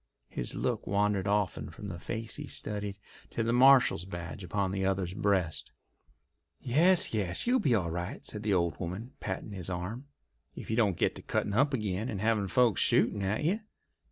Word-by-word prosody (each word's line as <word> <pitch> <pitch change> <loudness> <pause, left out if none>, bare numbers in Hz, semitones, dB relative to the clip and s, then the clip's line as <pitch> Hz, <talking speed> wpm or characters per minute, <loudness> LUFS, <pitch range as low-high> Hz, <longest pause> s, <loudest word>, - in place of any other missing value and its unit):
His - - -3
look - - -2
wandered 100 0 +1
often 100 -2 0
from 105 - -9
the 85 -3 -6
face 115 +5 -4
he 145 -1 -6
studied 105 -4 -4 0.3
to 115 - -2
the 115 +1 +1
marshal's 130 -7 +6
badge 85 -1 -7
upon 95 +1 -1
the 95 0 -1
other's 95 -2 0
breast. 95 -6 0 0.9
"Yes, 165 +8 +4
yes, 95 -5 -1
you'll 250 +2 +3
be 130 - +3
all 85 -6 0
right," 90 - -5
said 105 - -5
the 105 -1 -1
old 85 -5 +1
woman, 95 +9 -5
patting 110 - -4
his 95 -3 -3
arm, 95 +10 -4 0.5
"if - - -7
you - - +1
don't 105 -7 +2
get - - +2
to - - -8
cuttin' 100 - -1
up 140 +6 +3
agin, 105 0 -2
and 100 - -3
havin' 110 -1 +1
folks 120 0 +3
shooting 105 - +3
at 100 +7 -1
you. 185 +8 +1
105 Hz, 185 wpm, -30 LUFS, 95-115 Hz, 0.9 s, marshal's